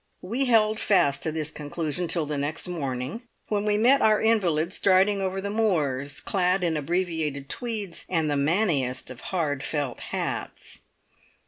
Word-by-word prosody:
We 235 +9 -1
held 220 -3 +3
fast 145 -9 +3
to 160 - 0
this 155 -1 -3
conclusion 155 +3 -3
till 165 -2 0
the 150 0 -3
next 145 +5 -1
morning, 140 - -3 0.3
when 210 -1 0
we 210 -1 +2
met 255 +6 +5
our 215 -1 +4
invalid 185 -7 +2
striding 195 +1 +3
over 190 0 -1
the 200 +1 -3
moors, 145 -10 0
clad 185 -1 +1
in 165 -2 +1
abbreviated 155 -3 -2
tweeds, 215 -7 -4
and 165 -4 +1
the 145 - 0
manniest 140 -5 0
of 125 - -10
hard 150 -7 -1
felt 145 -3 -3
hats. - - -5
170 Hz, 155 wpm, -26 LUFS, 145-205 Hz, 0.3 s, met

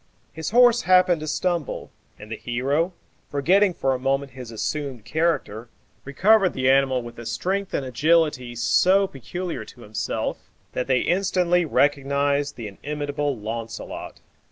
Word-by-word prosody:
His 160 +1 -4
horse 240 +1 +5
happened 185 -2 +4
to 155 - -5
stumble, 170 -1 -2 0.3
and 105 +1 -12
the - - -2
hero, 140 - -1 0.4
forgetting 180 +7 +3
for 135 0 0
a 130 - -3
moment 135 +1 -1
his 125 -3 -9
assumed 130 +1 -4
character, 135 -6 -1 0.4
recovered 190 +7 +3
the 130 0 +2
animal 135 -2 +2
with 120 0 -10
a 120 - -8
strength 195 +1 -2
and 135 - -2
agility 145 -2 +1
so 185 - +3
peculiar 175 +3 -5
to 125 - -15
himself, 110 -1 -4 0.2
that 125 - -2
they 130 -2 +2
instantly 180 -1 +2
recognized 140 0 +1
the 115 -3 -6
inimitable 145 +4 -3
Launcelot. 115 +2 -6
140 Hz, 140 wpm, -24 LUFS, 125-175 Hz, 0.4 s, horse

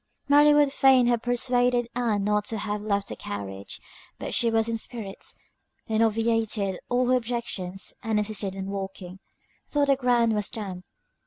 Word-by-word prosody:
Mary 295 +1 +6
would 295 -2 +4
fain 265 -3 +5
have 240 -1 +2
persuaded 245 0 +1
Ann 225 -5 0
not 210 0 +1
to 220 - -3
have 210 0 -3
left 200 -1 -1
the - - -5
carriage; 100 -1 -6 0.4
but - - -5
she 235 - +2
was 225 0 +2
in 230 - -1
spirits, 220 -5 -6 0.5
and 220 0 +1
obviated 225 -3 +1
all 245 0 +2
her 255 - +5
objections, 225 -6 -4
and 220 -1 0
insisted 210 -2 -2
on 190 - -4
walking, 190 -2 -6 0.5
tho' 290 -1 +3
the 275 -1 +4
ground 240 -3 +2
was 210 -1 -1
damp. 195 -6 -6
225 Hz, 165 wpm, -26 LUFS, 200-245 Hz, 0.5 s, Mary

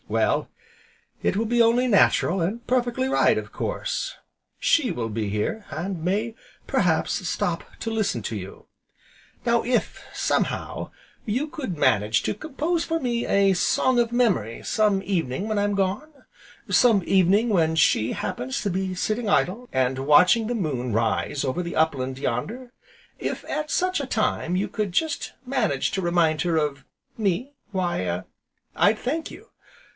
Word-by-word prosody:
Well, - - +1 0.7
it - - +1
will 225 - +1
be 240 +1 +2
only 235 +2 +4
natural, 195 -4 +3
and 220 +8 -2
perfectly 250 +1 +1
right, 265 - +3
of - - -5
course, - - -3 0.4
She 290 -7 +3
will 115 -2 -3
be 110 -1 -3
here, 105 - -2
and 165 +3 -4
may, 210 +6 0 0.3
perhaps, - - +1
stop - - -1 0.2
to 225 - -2
listen 210 - 0
to 110 - -4
you. 95 -1 -8 0.8
Now 235 -1 +3
if, 245 0 -1
somehow, - - -1 0.4
you 250 +8 -1
could 260 - -5
manage 110 -5 +2
to - - 0
compose 315 - -2
for 330 0 -1
me 240 -4 -1
a 195 -1 +4
Song 250 +7 +2
of 235 -1 +1
Memory, 200 - +1
some 210 -3 +2
evening 180 -1 -1
when 215 -2 0
I'm 205 0 +1
gone, 200 +10 -1 0.6
some 225 -6 +4
evening 195 +4 +4
when 165 -7 +2
She 120 -7 +3
happens 130 +1 -3
to 205 - 0
be 190 0 -2
sitting 215 +4 -1
idle, 220 +6 +1
and 130 0 +1
watching 180 - +5
the 245 - -1
moon 135 - -2
rise 115 +6 0
over 135 +7 -1
the 170 - -5
upland 135 -5 0
yonder; 235 - -3 0.5
if, - - -4
at 305 0 -3
such 370 -3 +1
a 275 - -5
time, 185 -6 0
you 195 - 0
could 210 -3 -3
just 310 - -1
manage 240 - 0
to 190 - -1
remind 170 -4 +2
her 170 -1 +1
of 145 -3 -1 0.3
me, 220 +6 -1 0.2
why 175 - -1 0.5
I'd 210 +1 +4
thank 315 +8 -3
you. - - -12
195 Hz, 155 wpm, -24 LUFS, 155-240 Hz, 0.8 s, watching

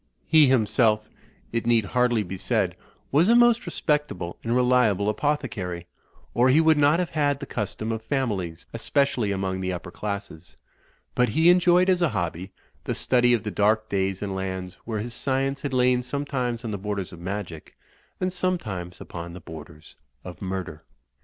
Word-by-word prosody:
He 155 -3 +6
himself, 110 -3 +2 0.4
it 115 0 -2
need 115 -3 +3
hardly 120 +1 +1
be 95 0 -6
said, 95 -2 0 0.4
was 160 +8 +4
a 235 - +6
most 240 -4 +4
respectable 150 - -1
and 115 +1 0
reliable 125 -5 +3
apothecary, 105 - -2 0.5
or 125 +2 +4
he 140 +5 +5
would 160 -2 +4
not 145 +2 +5
have 180 -1 -2
had 145 -3 +1
the 140 - -6
custom 110 +1 -4
of 110 0 -3
families, 105 - -2
especially 120 -2 0
among 95 -1 -2
the 95 0 -1
upper 90 0 -6
classes; 100 -6 -6 0.6
but 125 0 +2
he 165 +3 +5
enjoyed 180 0 +4
as 185 -1 +3
a 170 - +3
hobby, 90 -2 -3 0.3
the - - -2
study 125 -1 +3
of 110 - -4
the 105 - -3
dark 110 +2 +2
days 95 0 -1
and 100 -1 -3
lands 95 -1 -4
where 110 -2 -3
his 120 +2 -5
science 135 +2 -1
had 145 - -3
lain 125 -1 +3
sometimes 125 -3 -3
on 110 - -3
the 100 - -4
borders 100 -2 -4
of 85 - -10
magic 90 -3 -6 0.4
and 185 0 -1
some 185 0 0
times 90 - -7
upon 85 0 -7
the 90 - -8
borders 80 -1 -12 0.3
of 90 - -10
murder. 95 -5 -4
110 Hz, 175 wpm, -25 LUFS, 95-140 Hz, 0.6 s, He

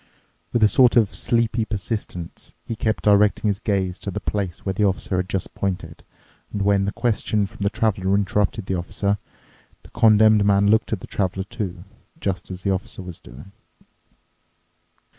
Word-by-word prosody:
With 120 - +2
a - - +8
sort 125 +3 +4
of 115 -5 +4
sleepy 115 -1 +1
persistence 105 -5 -5
he 115 - -4
kept 110 0 -1
directing 105 +1 +4
his 100 -1 -1
gaze 95 -4 -1
to - - -5
the 105 - -3
place 100 -5 -3
where 95 - 0
the 105 - 0
Officer 95 -1 0
had 90 0 -2
just 95 0 -3
pointed, 90 -4 -4 0.5
and 100 - -2
when 100 -1 +3
the 100 - -1
question 110 -3 0
from 95 - -12
the 100 - +2
Traveler 100 -3 0
interrupted 100 +1 0
the 95 - -2
Officer, 100 +3 -1 0.6
the - - -17
Condemned 110 -2 +5
Man 100 0 +4
looked 110 - +2
at 105 -5 -2
the - - -7
Traveler, 95 -1 -1
too, 95 -5 -5 0.4
just 95 -3 -3
as 90 -1 -7
the 100 - +1
Officer 95 0 -3
was 90 -2 -8
doing. 75 +10 -13
100 Hz, 175 wpm, -22 LUFS, 95-110 Hz, 0.6 s, a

